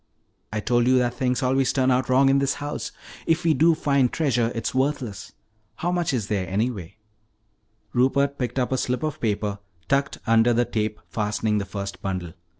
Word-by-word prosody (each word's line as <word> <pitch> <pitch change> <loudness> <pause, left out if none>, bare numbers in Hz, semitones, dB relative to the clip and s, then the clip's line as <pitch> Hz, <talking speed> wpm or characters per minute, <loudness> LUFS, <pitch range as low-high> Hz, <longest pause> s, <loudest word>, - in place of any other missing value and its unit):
I 110 - -2
told 120 +2 +2
you 130 0 +5
that 125 -1 +1
things 125 +2 -1
always 130 +1 +2
turn 130 -1 +2
out 130 +1 +1
wrong 135 +2 +5
in 135 0 +4
this 140 0 +1
house. 145 0 -5 0.4
If 165 +2 +2
we 165 -1 +4
do 165 +2 +4
find 140 -5 +2
treasure, 120 -7 +1
it's 115 - -2
worthless. 130 -6 -2 0.4
How 175 - -2
much 175 -2 0
is 120 -6 -1
there, 100 -3 -2
anyway?" 100 -2 -2 1.0
Rupert 140 +3 +2
picked 125 0 -2
up 125 -1 0
a 130 - +1
slip 125 +4 -1
of 155 -1 -3
paper 105 -2 -1 0.3
tucked 140 +1 +1
under 115 +1 +4
the 120 +1 +2
tape 110 -2 -2
fastening 105 0 -1
the 100 - -3
first 100 -1 -6
bundle. 90 -4 -4
125 Hz, 185 wpm, -24 LUFS, 110-140 Hz, 1.0 s, you